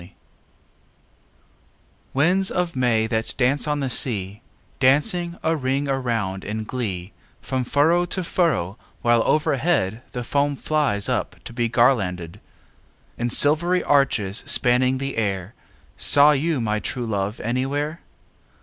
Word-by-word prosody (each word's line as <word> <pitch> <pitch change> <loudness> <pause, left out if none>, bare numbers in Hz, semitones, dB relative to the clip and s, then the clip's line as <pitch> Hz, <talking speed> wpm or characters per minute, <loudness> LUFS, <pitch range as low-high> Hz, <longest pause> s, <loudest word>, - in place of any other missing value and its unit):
IX 90 +2 -14 2.0
Winds 180 +7 +2
of 180 -3 -2
May, 120 -4 +1
that 110 0 -2
dance 135 +4 +1
on 150 -1 -1
the 135 - -2
sea, 105 -4 +1 0.4
Dancing 170 +6 +2
a 160 +1 +1
ring 135 0 -1
around 115 -8 -2
in 110 +1 -4
glee 105 -6 -5 0.3
From 130 -1 -3
furrow 160 +7 +2
to 185 +1 -2
furrow, 160 - -1 0.2
while 120 -1 +3
overhead 135 - +1
The 125 - -4
foam 140 +3 0
flies 140 -9 0
up - - -2
to - - -9
be 120 -1 -1
garlanded, 100 -9 +1 0.8
In 120 0 -1
silvery 170 +8 +3
arches 115 -8 +1
spanning 125 +1 +2
the 135 -1 -4
air, 100 -2 -2 0.4
Saw 145 +1 +5
you 150 +1 0
my 110 -2 -1
true 120 +3 -3
love 105 -1 -3
anywhere? 140 +7 -2
130 Hz, 130 wpm, -22 LUFS, 110-145 Hz, 2.0 s, Saw